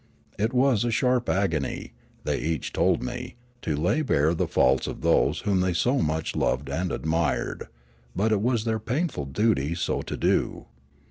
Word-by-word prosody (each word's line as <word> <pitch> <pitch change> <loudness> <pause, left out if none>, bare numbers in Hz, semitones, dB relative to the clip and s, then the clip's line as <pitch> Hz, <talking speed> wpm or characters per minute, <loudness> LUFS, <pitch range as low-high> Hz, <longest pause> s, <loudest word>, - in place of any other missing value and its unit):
It 110 +3 +1
was 130 -3 +3
a 120 - 0
sharp 125 +1 +1
agony, 85 -7 -1 0.3
they - - -1
each 80 -1 -3
told - - +2
me, - - -5 0.3
to 75 - -1
lay 85 - +1
bare 80 - +2
the 85 - -1
faults 65 +1 +2
of - - -6
those - - +2
whom 100 -3 +1
they 90 -1 +1
so 125 +10 +1
much 80 +1 -1
loved 70 +2 0
and 85 +6 -2
admired; 80 -3 -1 0.5
but 110 +4 +1
it 105 -2 +2
was 120 -1 +1
their 110 -1 0
painful 125 - -2
duty 85 -1 +1
so 85 - -1
to - - -5
do. - - 0
95 Hz, 175 wpm, -26 LUFS, 80-115 Hz, 0.5 s, was